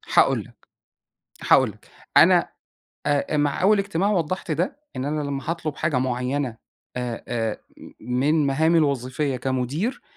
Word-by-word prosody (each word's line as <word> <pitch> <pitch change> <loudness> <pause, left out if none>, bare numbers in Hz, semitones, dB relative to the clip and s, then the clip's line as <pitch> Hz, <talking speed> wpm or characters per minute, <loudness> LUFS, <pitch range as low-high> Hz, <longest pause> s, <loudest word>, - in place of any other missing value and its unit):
هاقول - - +5
لك، - - -21 0.8
هاقول - - +6
لك، - - -18 0.3
أنا - - +6 0.6
أ 145 +1 +1
مع 145 +3 0
أول 205 +2 +5
اجتماع 195 0 0
وضّحت 185 -2 -1
ده، 175 - -1 0.2
إن 130 - -3
أنا 150 +1 -1
لمّا 140 +1 -3
هاطلب 160 -3 -3
حاجة 155 -5 0
معينة 125 0 -1 0.4
آآ 120 -2 -4
آآ، 115 -3 -2 0.4
من 140 +5 +1
مهامي 160 +5 +3
الوظيفية 140 -1 0
كمدير 130 - -2
145 Hz, 135 wpm, -23 LUFS, 130-160 Hz, 0.8 s, هاقول